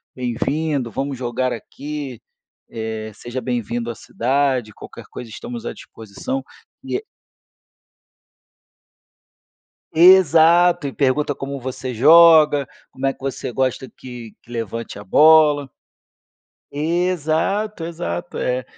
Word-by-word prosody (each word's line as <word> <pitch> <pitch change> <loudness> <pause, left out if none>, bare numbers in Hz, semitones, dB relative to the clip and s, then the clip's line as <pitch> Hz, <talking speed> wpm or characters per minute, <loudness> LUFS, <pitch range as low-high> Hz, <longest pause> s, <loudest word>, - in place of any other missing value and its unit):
bem-vindo, 130 +2 -2
vamos 135 +4 -4
jogar 125 +1 -2
aqui. 140 +1 -7 0.5
Eh, 110 -1 -5
seja 120 +4 -6
bem-vindo 120 -1 -3
à 115 - -9
cidade, 130 -1 -1
qualquer - - -11
coisa 120 - -8
estamos 120 +2 -8
à - - -4
disposição". 115 - -6 0.4
E 425 - -3 2.9
Exato, 170 -1 +6
e 135 - -4
pergunta 145 +1 0
como 140 +1 -6
você 130 -1 -5
joga, 155 +1 +6 0.2
como 135 +1 -4
é 135 - +2
que - - -32
você 135 -2 -4
gosta 130 +1 -1
que 120 -4 -11
que 120 - -21
levante 115 -2 -5
a 100 - -10
bola. 150 +3 +5 1.0
Exato, 175 +5 -1
exato. 165 - -5
É 125 0 -1
135 Hz, 110 wpm, -20 LUFS, 120-160 Hz, 2.9 s, Exato